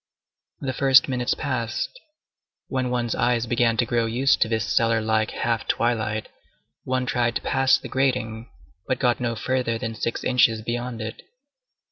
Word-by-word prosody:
The 130 -2 -2
first 135 0 +5
minutes 125 -2 0
passed; 130 - -3 0.7
when 130 -2 -1
one's 120 -2 -1
eyes 120 -1 +1
began 115 -1 +1
to 120 - +2
grow 115 0 0
used 125 +4 +2
to - - +4
this 110 -2 0
cellar 115 -1 +2
like 110 0 +1
half 115 -1 -2
twilight, 110 -2 0 0.6
one 130 0 0
tried 120 -2 0
to - - -1
pass 135 -1 +3
the - - -9
grating, 125 -4 -1 0.4
but 130 - 0
got 120 -2 +1
no 120 -2 -1
further 125 0 -1
than 115 -1 -4
six 115 +1 -3
inches 115 -3 +3
beyond 120 0 -4
it. 110 +1 -6
120 Hz, 160 wpm, -24 LUFS, 115-130 Hz, 0.7 s, first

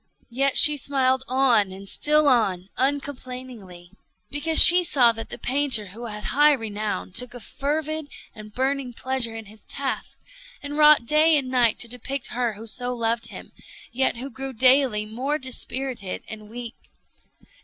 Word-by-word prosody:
Yet 275 +2 +1
she 300 0 +8
smiled 265 -2 0
on 245 -6 +1
and 195 +1 -11
still 300 +7 +1
on, 195 -8 0
uncomplainingly, 255 -9 -5 0.4
because 310 +2 -1
she 360 +1 +10
saw 260 -8 +4
that 225 0 -8
the - - -7
painter 260 -6 +1
(who 235 +3 -9
had 210 -1 -8
high 295 +2 +3
renown) 210 - -5
took 250 0 -4
a - - -8
fervid 305 +5 -4 0.3
and 215 -1 -13
burning 265 +1 -3
pleasure 250 -2 -2
in 225 -1 -8
his 210 +1 -15
task, 275 -1 -4 0.5
and 290 0 -6
wrought 300 -5 +5
day 305 +4 +4
and 265 -3 -3
night 245 -4 +1
to 240 - +2
depict 250 +3 -6
her 240 -2 -2
who 215 +2 -11
so 245 +2 -3
loved 230 0 -1
him, - - -11 0.4
yet 255 0 0
who 265 +3 -7
grew 270 +2 -7
daily 255 -3 +3
more 255 +7 -3
dispirited 260 -5 -4
and 215 -1 -10
weak. 235 +1 -8
250 Hz, 160 wpm, -23 LUFS, 225-275 Hz, 0.5 s, she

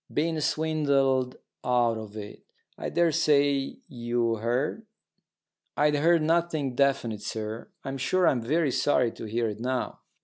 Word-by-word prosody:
Been 160 +1 0
swindled 140 -5 +1 0.3
out 120 -2 +2
of 110 -1 -9
it. 105 -1 -8 0.3
I - - -4
daresay 145 -4 +2
you 120 -2 -1
heard?" 125 - -1 0.9
"I'd 150 0 +3
heard 165 +2 +4
nothing 160 -4 +1
definite, 125 -5 +1
sir. 110 +1 -5
I'm 135 0 -5
sure 180 +7 +2
I'm 125 -6 +2
very 150 +5 +1
sorry 125 -3 +2
to - - -9
hear 115 +2 -1
it 105 0 -6
now." 125 +2 -2
135 Hz, 135 wpm, -27 LUFS, 120-155 Hz, 0.9 s, heard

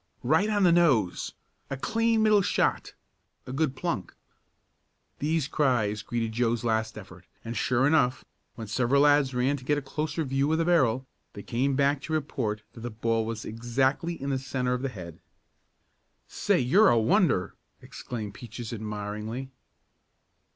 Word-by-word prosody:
"Right 160 - +2
on 205 -2 +2
the 175 - +6
nose!" 135 - +2 0.3
"A 140 - -3
clean 225 - +1
middle 215 -2 +5
shot!" - - 0 0.5
"A 130 - -7
good 140 -1 0
plunk!" 130 - -3 1.0
These 155 -1 0
cries 120 -9 +1
greeted 115 0 -3
Joe's 115 0 0
last 110 -1 -1
effort, - - -12 0.2
and, 115 +1 -5
sure 125 +4 +1
enough, 135 -4 +2 0.3
when 115 - -6
several 125 +6 +2
lads 145 -3 +4
ran 130 +3 +1
to 130 - -12
get 145 +3 +1
a - - -2
closer 155 +4 -3
view 135 +1 0
of 160 - +2
the 165 - +1
barrel, 130 -8 +2 0.3
they 100 - -9
came 130 +3 0
back 140 0 +2
to 160 - -5
report 125 -8 -2
that - - -11
the 120 +1 -5
ball 115 0 -1
was 115 -1 -5
exactly 130 +9 -1
in 140 +1 -3
the 135 - 0
centre 130 -1 -2
of 125 - -2
the 135 - -2
head. 90 -8 -10 1.1
"Say, - - +1
you're 190 - +5
a 120 - +4
wonder!" 110 -1 +2 0.3
exclaimed 110 -4 -7
Peaches, 120 +1 -8
admiringly. 105 +4 -5
130 Hz, 160 wpm, -27 LUFS, 115-150 Hz, 1.1 s, the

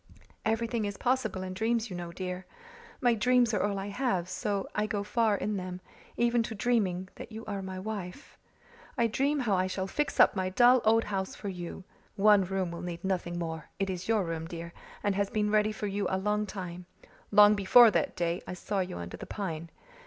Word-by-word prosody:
Everything 225 +1 0
is 205 -1 -4
possible 235 -7 0
in 185 0 -5
dreams, 225 +2 0
you - - -4
know, 175 -1 -5
dear. 180 +1 -5 0.5
My 245 -3 +4
dreams 240 +1 +3
are 205 - +1
all 205 -1 0
I 195 +1 -4
have, 200 -6 -1
so 195 +2 -2
I 210 0 0
go 205 -1 -2
far 215 0 +2
in 210 +1 -2
them, 185 -1 -5 0.4
even 235 0 +3
to 225 -1 -4
dreaming 200 -5 0
that - - -9
you 220 +1 -8
are 200 -2 -4
my 190 0 -6
wife. 195 +2 -6 0.6
I 235 - +3
dream 275 +6 +1
how 225 -5 +1
I 185 0 +2
shall 190 0 -2
fix 295 +10 -2
up - - +7
my 185 -1 0
dull 245 +5 +5
old 225 +1 +5
house 190 -2 -3
for 205 - -5
you. 180 0 -6 0.3
One 205 -1 +5
room 185 -1 -2
will 170 0 -6
need 175 -1 -6
nothing 180 -2 -1
more 160 -2 -5
it 195 -1 -1
is 180 -1 -5
your 220 -3 +2
room, 165 -1 -4
dear, 170 0 -7 0.3
and 205 - +2
has 200 0 0
been 210 -1 0
ready 215 0 +3
for 215 - -5
you 200 -1 -1
a 190 - 0
long 210 +2 0
time 180 -3 -7 0.4
long 210 0 +7
before 215 +3 +7
that - - 0
day 170 0 -1
I 180 - -5
saw 200 +2 -2
you 180 - -3
under 85 0 -6
the - - -9
pine. 170 -5 -4
200 Hz, 210 wpm, -30 LUFS, 185-220 Hz, 0.6 s, up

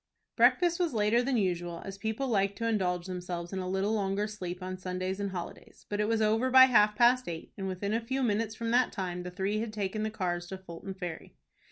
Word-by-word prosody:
Breakfast 345 -1 +4
was 340 -8 0
later 215 +3 +3
than 250 0 0
usual, 175 -4 -1
as 195 0 -7
people 220 +6 -2
like 200 -4 +1
to 230 - -2
indulge 180 -5 0
themselves 180 -1 -5
in 190 - -2
a 185 -1 -3
little 190 +3 0
longer 200 -1 0
sleep 185 -4 -6
on 185 0 -4
Sundays 185 +1 -3
and 200 -1 -1
holidays; 180 -3 -8
but 205 - -2
it 210 - +2
was 225 -1 +2
over 225 +4 +2
by 260 0 +9
half 210 -5 +4
past 245 +2 +4
eight, 165 -1 -7
and 195 -1 -4
within 190 +2 -2
a 225 - +1
few 265 +4 -2
minutes 220 -1 0
from 230 +1 -3
that 250 +1 +3
time 180 -2 -3
the 180 - -5
three 195 +3 -1
had 225 0 -3
taken 210 0 -3
the 215 - 0
cars 175 -4 -2
to 190 - -6
Fulton 190 +1 -8
Ferry. 175 -4 -7
200 Hz, 230 wpm, -30 LUFS, 185-225 Hz, -, by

